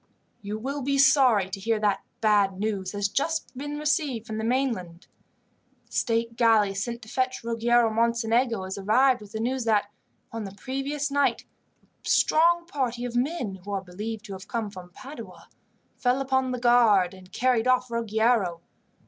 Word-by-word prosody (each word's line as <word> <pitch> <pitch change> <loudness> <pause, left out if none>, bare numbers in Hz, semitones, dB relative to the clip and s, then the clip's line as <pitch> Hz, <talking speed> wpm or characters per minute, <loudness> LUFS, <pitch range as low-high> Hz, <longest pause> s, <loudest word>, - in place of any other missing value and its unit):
"You 210 +1 -4
will 275 +6 -4
be 275 +1 0
sorry 260 -7 +5
to 195 - -5
hear 225 +2 0
that 205 -2 +1 0.2
bad 205 -3 +3
news 200 -3 -2
has 205 0 0
just 280 +3 -2
been 290 +3 -5
received 295 - -1
from 220 -1 -5
the - - -3
mainland. 225 -9 -2 0.8
The - - -34
state 230 0 0
galley 220 -4 +4
sent 235 +4 -4
to - - -13
fetch 255 +2 -2
Ruggiero 235 0 +2
Mocenigo 230 -1 +1
has 190 +1 -5
arrived 245 +5 +3
with 205 -1 -12
the 220 - -5
news 250 +3 -1
that, 210 -2 +1 0.4
on 225 -1 -5
the 195 0 -9
previous 275 +6 -3
night, 285 0 +1 0.6
a - - -5
strong 340 +2 +3
party 250 -7 -2
of 245 -1 -5
men 245 - -2
who 205 - -10
are 195 -1 -2
believed 210 +4 -6
to 200 - -7
have 190 0 -9
come 225 -4 -3
from 185 -3 -11
Padua, 265 +11 -11 0.5
fell 250 +1 +1
upon 265 -1 0
the 250 - -2
guard 230 -7 +4
and 185 0 -15
carried 250 0 +1
off 255 -1 +2
Ruggiero. 220 -5 +1
230 Hz, 175 wpm, -26 LUFS, 205-260 Hz, 0.8 s, sorry